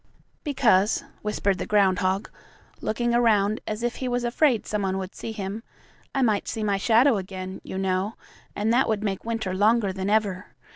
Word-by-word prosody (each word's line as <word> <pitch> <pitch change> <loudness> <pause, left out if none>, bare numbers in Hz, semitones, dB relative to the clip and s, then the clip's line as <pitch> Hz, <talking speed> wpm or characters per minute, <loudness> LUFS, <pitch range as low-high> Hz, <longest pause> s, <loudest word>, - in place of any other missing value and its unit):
"Because," 220 - +3 0.2
whispered 205 -2 0
the - - -3
groundhog, 190 -1 +2 0.5
looking 240 +2 0
around 215 -3 +3
as 215 +2 -3
if 240 0 -1
he 260 - -3
was 245 0 -1
afraid 240 -1 +2
some 210 -1 -2
one 190 -1 -1
would 190 0 -5
see 225 - -6
him, 205 0 -5 0.5
"I 270 - +2
might 215 -4 +1
see 220 - -3
my 200 -2 +1
shadow 230 +4 +4
again, 185 -1 -6
you 190 - -6
know, 190 +2 -1 0.4
and 215 +2 +1
that 255 0 +3
would 215 -1 0
make 195 -1 -2
winter 225 -5 -2
longer 205 0 +3
than 190 +1 -3
ever. 205 -3 0
210 Hz, 180 wpm, -25 LUFS, 190-230 Hz, 0.5 s, shadow